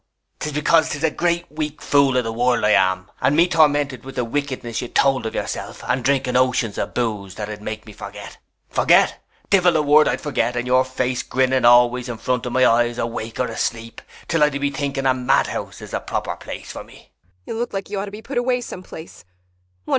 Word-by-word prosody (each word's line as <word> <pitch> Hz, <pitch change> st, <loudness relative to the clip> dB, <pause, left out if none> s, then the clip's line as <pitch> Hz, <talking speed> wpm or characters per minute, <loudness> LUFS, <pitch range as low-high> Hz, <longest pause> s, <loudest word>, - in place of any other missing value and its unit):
] -, -, -51 dB
'Tis 150 Hz, -, -3 dB
because 150 Hz, +2 st, +3 dB
'tis 145 Hz, +1 st, -4 dB
a 160 Hz, -, +3 dB
great 170 Hz, +1 st, 0 dB
weak 150 Hz, -1 st, -4 dB
fool 140 Hz, -3 st, +3 dB
of 125 Hz, -, +2 dB
the 115 Hz, -1 st, -4 dB
world 120 Hz, 0 st, +1 dB
I 105 Hz, -, +4 dB
am, 95 Hz, 0 st, +2 dB
and 145 Hz, -, +3 dB
me 170 Hz, +3 st, +5 dB
tormented 145 Hz, -5 st, +2 dB
with 135 Hz, 0 st, -10 dB
the 125 Hz, -, -1 dB
wickedness 130 Hz, -3 st, -3 dB
you'd 125 Hz, -, -8 dB
told 135 Hz, -4 st, +3 dB
of -, -, -6 dB
yourself, -, -, -5 dB
and 130 Hz, -, 0 dB
drinking 130 Hz, -1 st, +1 dB
oceans 125 Hz, -4 st, +1 dB
of -, -, -4 dB
booze 105 Hz, -6 st, -2 dB
that'd 105 Hz, -1 st, -6 dB
make 110 Hz, +1 st, -6 dB
me 105 Hz, -, -11 dB
forget. -, -, -10 dB, 0.3 s
Forget? -, -, +3 dB, 0.3 s
Divil 180 Hz, -4 st, +4 dB
a 155 Hz, -, +1 dB
word 150 Hz, +1 st, +5 dB
I'd -, -, 0 dB
forget, 125 Hz, -5 st, -1 dB
and 120 Hz, 0 st, -2 dB
your 130 Hz, +1 st, +4 dB
face 130 Hz, -1 st, -2 dB
grinning 130 Hz, 0 st, +1 dB
always 120 Hz, +1 st, +5 dB
in 120 Hz, -, -4 dB
front 125 Hz, +1 st, -1 dB
of -, -, -4 dB
my 130 Hz, 0 st, +4 dB
eyes, 120 Hz, +1 st, +3 dB
awake 115 Hz, -1 st, -4 dB
or 125 Hz, -, +2 dB
asleep, 115 Hz, -1 st, -4 dB, 0.3 s
'til 165 Hz, -2 st, +2 dB
I 150 Hz, -, +5 dB
do 140 Hz, -1 st, -4 dB
be 140 Hz, 0 st, 0 dB
thinking 140 Hz, -1 st, -3 dB
a 130 Hz, -, +4 dB
madhouse 130 Hz, +1 st, -1 dB
is -, -, -10 dB
the -, -, -1 dB
proper -, -, -3 dB
place -, -, -8 dB
for -, -, -7 dB
me. -, -, -18 dB
130 Hz, 190 wpm, -21 LUFS, 120-145 Hz, 0.3 s, me